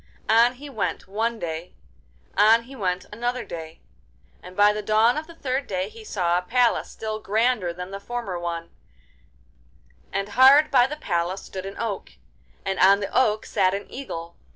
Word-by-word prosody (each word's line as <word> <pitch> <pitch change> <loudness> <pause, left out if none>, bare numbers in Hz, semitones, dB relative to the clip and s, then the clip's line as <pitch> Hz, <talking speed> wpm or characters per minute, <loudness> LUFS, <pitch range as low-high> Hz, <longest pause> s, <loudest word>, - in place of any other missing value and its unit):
On 235 +3 +5
he 285 +4 -10
went 275 - -3
one 225 +4 -1
day, 165 -2 -6 0.6
on 220 +3 +5
he 265 +3 -12
went 185 -5 -2
another 245 +3 -2
day, 160 -1 -8 0.6
and 180 +1 -12
by 205 0 +6
the 210 - -3
dawn 215 +3 +3
of 310 +1 -4
the 335 - -13
third 270 -2 -2
day 190 0 -2
he 225 0 -12
saw 180 -4 0
a - - -5
palace 240 +6 +1
still 215 -1 -5
grander 220 -2 +1
than 180 +2 -7
the 195 - -5
former 200 -4 -4
one 170 -1 -4 1.4
and 195 +1 -2
hard 270 +7 +6
by 250 -3 +5
the 300 - -5
palace 175 - -2
stood 190 0 -7
an 195 - -8
oak, 220 -4 -4 0.5
and 195 -1 -2
on 195 +2 +6
the 200 - -5
oak 215 -4 +2
sat 185 +1 +1
an 200 - -5
eagle. 170 -11 -7
210 Hz, 175 wpm, -24 LUFS, 185-240 Hz, 1.4 s, by